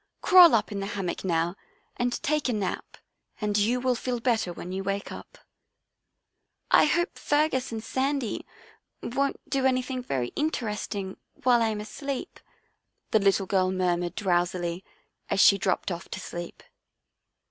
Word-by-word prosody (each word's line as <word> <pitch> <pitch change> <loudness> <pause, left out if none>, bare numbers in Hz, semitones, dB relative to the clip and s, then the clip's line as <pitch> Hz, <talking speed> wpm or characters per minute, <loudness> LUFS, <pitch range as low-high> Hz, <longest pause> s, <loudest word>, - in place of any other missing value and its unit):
Crawl 360 - +8
up 220 - 0
in 200 - -3
the 195 - -3
hammock 185 -3 -3
now 170 -1 0 0.4
and 245 0 -2
take 300 -2 +1
a - - +1
nap, 200 -4 -3 0.4
and 210 -2 -1
you 220 +5 +2
will 255 0 +1
feel 245 0 -3
better 230 -6 0
when 175 +1 -7
you 190 +1 -3
wake 200 +1 -3
up." - - -10 0.7
" - - -54 0.3
I - - +7
hope 345 +4 0
Fergus 290 -4 +1
and 220 -1 -5
Sandy 270 -2 -1 0.6
won't 275 +3 -1
do 270 -1 +1
any 255 -1 +1
thing 255 0 -4
very 130 - -2
interesting 210 -9 -3 0.3
while 245 -2 +4
I 225 - +3
am 215 -1 -2
asleep," 275 - -6 0.7
the 220 - +5
little 195 -1 +2
girl 185 -1 +1
murmured 175 -2 0
drowsily, 175 -2 0 0.5
as - - 0
she 200 0 +7
dropped 185 0 0
off 175 +1 -6
to - - -5
sleep. 175 0 -7
215 Hz, 160 wpm, -27 LUFS, 185-255 Hz, 0.7 s, Crawl